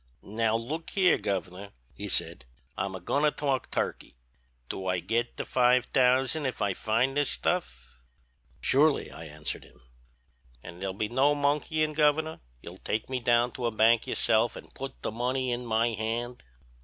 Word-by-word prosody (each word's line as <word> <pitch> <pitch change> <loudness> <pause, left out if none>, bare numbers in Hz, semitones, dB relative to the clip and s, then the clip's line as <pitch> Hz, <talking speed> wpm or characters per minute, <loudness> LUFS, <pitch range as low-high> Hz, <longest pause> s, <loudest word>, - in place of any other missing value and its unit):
"'Now 110 +2 0
look 145 +9 -4
here, 190 -2 +3
Governor,' 95 +1 -4 0.2
he - - -6
said, - - -2 0.3
'I'm 95 -1 -3
a - - -6
goin' 140 +11 0
to 150 - +5
talk 140 -3 -2
turkey; - - -3 0.5
do 95 +7 -5
I 90 0 +1
git 120 +6 -1
the - - -3
five 125 0 +3
thousand 130 +3 +2
if 130 - -4
I 100 -2 +1
find 115 +7 0
this 145 -2 +2
stuff?' 60 - -2 0.6
"'Surely,' 145 +2 +3
I 80 - -9
answered 75 0 -4
him. - - -20 0.8
"'An' 85 0 -10
there'll 95 0 -3
be 105 +2 -1
no 135 +6 +3
monkeyin', 150 +2 +1
Governor; 155 +1 +2 0.2
you'll 90 +2 -10
take 110 +4 -3
me 130 - 0
down 120 0 +3
to 120 -1 -3
a - - -1
bank 110 +1 +4
yourself - - +2
an' - - -11
put - - -8
the - - -2
money 125 +3 -1
in 120 0 -3
my 115 +1 +2
hand?' 115 +2 -3
120 Hz, 170 wpm, -28 LUFS, 100-140 Hz, 0.8 s, to